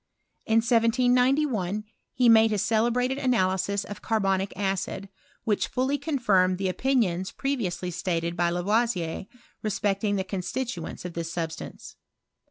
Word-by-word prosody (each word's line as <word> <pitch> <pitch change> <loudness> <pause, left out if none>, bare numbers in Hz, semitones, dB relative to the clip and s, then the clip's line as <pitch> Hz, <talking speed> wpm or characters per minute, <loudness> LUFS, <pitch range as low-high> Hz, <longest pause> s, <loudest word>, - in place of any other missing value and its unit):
In 225 +1 +4
1791 245 -2 +2 0.3
he 250 -1 +3
made' 220 -2 +5
celebrated 240 +5 +1
analysis 200 -5 +1
of 205 0 -8
carbonic 195 -3 0
acid, 195 0 -2 0.3
which 210 -2 0
fi 260 +3 0
confirmed 210 - +2
the 190 0 -1
opinions 190 -6 0
previously 190 -10 -2
stated 170 -1 -2
by 175 0 +2
Lavoi 185 -1 0 0.3
respecting 205 -1 0
the 190 - 0
constituents 190 0 -4
of 180 - -5
this 165 0 -4
substance. 165 -1 -6
205 Hz, 115 wpm, -26 LUFS, 185-240 Hz, 0.3 s, made